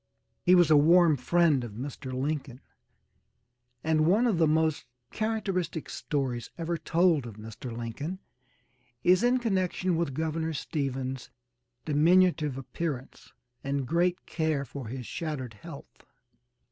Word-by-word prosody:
He 180 0 +5
was 175 -3 +5
a - - +8
warm 165 +1 +6
friend 150 0 +2
of 115 -3 -7
Mr. 130 +2 -6
Lincoln, 135 -1 -3 1.2
and 155 0 +2
one 210 +8 +4
of 210 -8 +1
the 160 - +5
most 160 0 +1 0.3
characteristic 195 -7 -2
stories 130 -5 -3
ever 170 0 -2
told 165 -3 +2
of 110 - -9
Mr. 110 +3 -8
Lincoln 120 +10 -5 0.9
is 180 +2 +5
in 245 +1 +3
connection 185 -5 0
with 160 -5 -1
Governor 160 +1 -2
Stephens' 135 -3 -3 0.6
diminutive 155 -1 +3
appearance 135 0 -5 0.3
and 140 -1 -1
great 175 +5 0
care 155 -4 -1
for 135 -3 -8
his 125 +2 -6
shattered 140 -7 -4
health. 105 - -12
155 Hz, 125 wpm, -28 LUFS, 135-175 Hz, 1.2 s, a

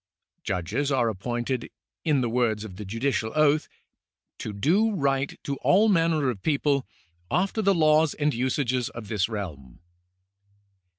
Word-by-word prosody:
Judges 105 - -1
are 125 -4 +2
appointed, 120 +4 -3 0.3
in 150 -5 +2
the 120 - 0
words 115 -3 0
of 95 -4 -9
the 105 - -7
judicial 115 +2 -1
oath, 155 0 +3 0.4
" - - -63
to 110 - -4
do 190 - +2
right 140 -3 0
to 140 -1 -3
all 210 +9 +4
manner 165 -7 +2
of 100 -6 -9
people, 140 -3 +1 0.4
after 190 - 0
the 200 -2 +3
laws 155 -1 +4
and 150 0 +1
usages 125 0 0
of 110 -3 -9
this 105 -2 0
realm." 75 - -6
130 Hz, 150 wpm, -26 LUFS, 110-155 Hz, 0.4 s, all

